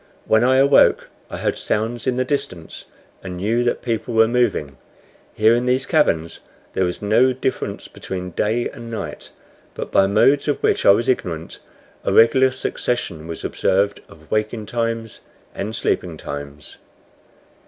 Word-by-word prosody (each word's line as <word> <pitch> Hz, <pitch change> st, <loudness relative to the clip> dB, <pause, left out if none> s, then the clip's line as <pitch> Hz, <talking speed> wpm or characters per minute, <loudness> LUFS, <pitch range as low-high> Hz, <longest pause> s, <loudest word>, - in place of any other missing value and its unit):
When 110 Hz, +1 st, +3 dB
I 130 Hz, +1 st, +4 dB
awoke 140 Hz, +1 st, +4 dB, 0.2 s
I -, -, -6 dB
heard -, -, -2 dB
sounds 115 Hz, +4 st, -2 dB
in 130 Hz, -, +1 dB
the 130 Hz, 0 st, 0 dB
distance, 90 Hz, -, -4 dB, 0.4 s
and 90 Hz, -1 st, -7 dB
knew 110 Hz, +6 st, 0 dB
that 120 Hz, -, -1 dB
people 115 Hz, 0 st, -2 dB
were 110 Hz, 0 st, +5 dB
moving. 110 Hz, -, 0 dB, 0.6 s
Here 110 Hz, +1 st, +4 dB
in 120 Hz, +1 st, 0 dB
these 130 Hz, +1 st, +1 dB
caverns 85 Hz, -, +1 dB, 0.3 s
there 95 Hz, -, +1 dB
was 90 Hz, +3 st, -4 dB
no 120 Hz, +5 st, +3 dB
difference 130 Hz, +1 st, -3 dB
between 90 Hz, -1 st, -6 dB
day 110 Hz, +6 st, 0 dB
and 115 Hz, -, -10 dB
night, 115 Hz, -, -6 dB, 0.5 s
but, -, -, -6 dB
by 95 Hz, -, +4 dB
modes 140 Hz, +9 st, +3 dB
of 145 Hz, -, +1 dB
which -, -, +2 dB
I -, -, +9 dB
was 115 Hz, +5 st, +4 dB
ignorant, 85 Hz, -10 st, -2 dB, 0.4 s
a -, -, 0 dB
regular 130 Hz, +4 st, +5 dB
succession 120 Hz, -9 st, -3 dB
was 85 Hz, -, -6 dB
observed 100 Hz, +2 st, 0 dB
of 80 Hz, -1 st, -18 dB
waking 110 Hz, 0 st, -1 dB
times 115 Hz, 0 st, -3 dB, 0.3 s
and 110 Hz, +3 st, -4 dB
sleeping 85 Hz, -5 st, -1 dB
times. 70 Hz, +1 st, -8 dB
110 Hz, 155 wpm, -21 LUFS, 90-125 Hz, 0.6 s, I